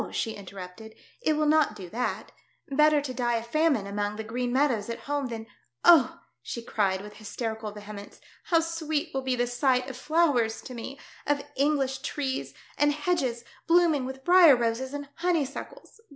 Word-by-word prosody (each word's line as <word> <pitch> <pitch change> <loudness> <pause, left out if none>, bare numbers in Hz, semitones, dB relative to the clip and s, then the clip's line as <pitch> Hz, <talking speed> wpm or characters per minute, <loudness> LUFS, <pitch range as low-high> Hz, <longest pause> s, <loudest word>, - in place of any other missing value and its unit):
she 225 - -1
interrupted, 195 +2 -10 0.3
"it 310 - +2
will 305 0 +1
not 305 -6 +3
do 190 -4 -8
that. 220 0 -3 0.4
Better 300 +1 +4
to 270 -3 -5
die 240 -1 0
of 230 0 -2
famine 300 -4 +2
among 205 +1 -2
the 220 - -5
Qfreen 245 +3 -2
meadows 245 -5 +1
at 230 - -5
home 285 -1 -2
than 225 -2 -6 0.2
— 120 +1 -52
oh 330 -7 +6
!" - - -51
she 235 - -6
cried, 195 -5 0
with 210 +1 -11
hysterical 220 0 -4
vehemence, 205 0 -10 0.3
"how 330 -2 +3
sweet 320 -1 -2
will 270 - -1
be 260 -1 0
the 245 - +1
sisfht 250 +1 +1
of 265 - -6
flowers 265 -6 +1
to 255 - -8
me, 255 +4 -7 0.3
of 285 0 +1
Engflish 275 -1 +1
trees, 270 -2 -3 0.2
and 290 0 +4
hedges 290 -6 -1 0.2
blooming 330 -5 +4
with 265 0 -8
briar 350 -5 +8
roses 240 +2 -1
and 285 0 -5
honeysuckles. 335 +3 -3
260 Hz, 180 wpm, -27 LUFS, 225-295 Hz, 0.4 s, briar